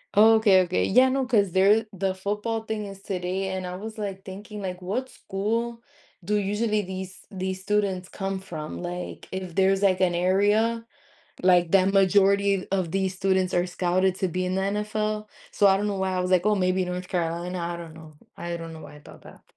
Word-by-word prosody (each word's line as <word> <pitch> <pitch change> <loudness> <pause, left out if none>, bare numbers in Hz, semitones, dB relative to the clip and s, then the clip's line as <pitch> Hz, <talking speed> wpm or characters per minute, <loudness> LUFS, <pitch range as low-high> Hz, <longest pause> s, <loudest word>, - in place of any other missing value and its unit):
Okay, 215 -2 +6
okay, 180 0 0
yeah, 255 +6 +5
no, 265 0 0
'cause 205 -7 +2
there 205 +4 +4
the 190 0 -1
football 210 +4 -3
thing 220 -1 -3
is 195 -1 -9
today, 190 0 -3
and 185 -1 -4
I 180 0 -5
was, 220 +3 -8
like, 195 -2 -5
thinking, 205 +2 -8
like, 185 -1 -5
"What 215 +9 -2
school 230 +4 -3 0.4
do 210 +5 0
usually 210 +2 0
these 190 0 -7
these 190 -1 -4
students 195 -2 -1
come 195 -1 -3
from?" 160 -5 -7
Like, 175 0 -6
if 185 -3 -5
there's, 195 0 +3
like, 190 -2 +3
an 180 -1 +3
area, 205 +6 +2 0.6
like, 175 -2 +4
that 195 +1 +4
majority 200 0 +3
of 185 -4 0
these 190 0 -1
students 190 -1 +1
are 175 0 +2
scouted 180 +1 +1
to 190 - 0
be 185 +1 -2
in 185 +1 -1
the 190 - 0
NFL? 210 +1 -2 0.2
So, 200 - +4
I 195 - +5
don't 205 - -1
know 200 -2 -2
why 190 0 -1
I 185 - 0
was 180 0 -2
like, 180 -1 +4
"Oh, 215 - +4
maybe 185 0 +1
North 180 0 -4
Carolina?" 175 +1 -2
I 170 0 -3
don't 170 -2 -9
know. 160 -1 -13 0.2
I 170 0 -4
don't 165 -1 -8
know 160 - -10
why 145 -1 -11
I - - -12
thought - - -14
that. - - -15
190 Hz, 205 wpm, -25 LUFS, 180-205 Hz, 0.6 s, Okay